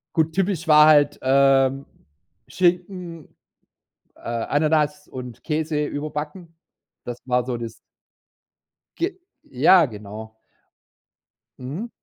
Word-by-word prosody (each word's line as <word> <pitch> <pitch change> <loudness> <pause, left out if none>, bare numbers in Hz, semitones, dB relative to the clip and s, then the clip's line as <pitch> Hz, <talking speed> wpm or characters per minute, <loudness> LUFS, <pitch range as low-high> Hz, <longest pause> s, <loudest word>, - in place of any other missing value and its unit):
Gut, 160 -1 +1
typisch 185 -3 -1
war 150 0 +7
halt, 145 -1 +4
ähm, 135 0 +3 0.6
Schinken, 175 -2 -2 0.8
äh, - - -22
Ananas 150 +5 0
und 125 -2 -9
Käse 155 -1 -1
überbacken. 150 +4 -6 0.5
Das 120 -1 -5
war 125 -1 0
so 125 -2 -3
das 115 -1 -6 1.2
Ge 365 +2 -3 0.2
ja, 155 +6 +4
genau. 110 -1 -9 1.3
Mhm. 155 - -6
150 Hz, 95 wpm, -22 LUFS, 130-165 Hz, 1.3 s, war